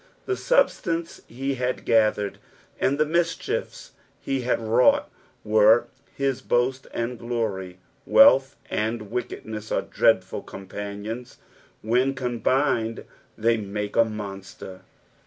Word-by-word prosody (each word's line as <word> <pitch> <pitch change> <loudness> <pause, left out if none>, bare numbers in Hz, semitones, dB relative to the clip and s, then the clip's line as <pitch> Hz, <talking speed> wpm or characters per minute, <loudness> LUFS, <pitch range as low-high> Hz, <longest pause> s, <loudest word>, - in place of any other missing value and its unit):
The 385 - 0
substance 180 - 0
he 135 +3 -3
liad 125 +1 -2
Ksthered, 110 -2 +2 0.4
and 140 +2 +1
tbe 155 0 +2
mischiefa 170 0 -2 0.3
he 135 -1 -2
had 125 - 0
wrought, 115 +2 +3 0.4
were 110 +2 +4 0.3
his 135 -2 -1
boast 130 +2 0
and 120 0 -3
glory. 105 -7 -3 0.3
Wealth 135 - +6 0.2
and 110 -1 -2
wickedness 110 -3 -5
are - - +1
dreadful - - +1
companions; 100 +4 -7 0.5
when 125 +5 +2
combined 120 -2 0 0.3
they 115 +1 +2
make 105 0 -4
a 115 - +6
monster. 100 -3 -8
115 Hz, 110 wpm, -25 LUFS, 105-130 Hz, 0.5 s, Wealth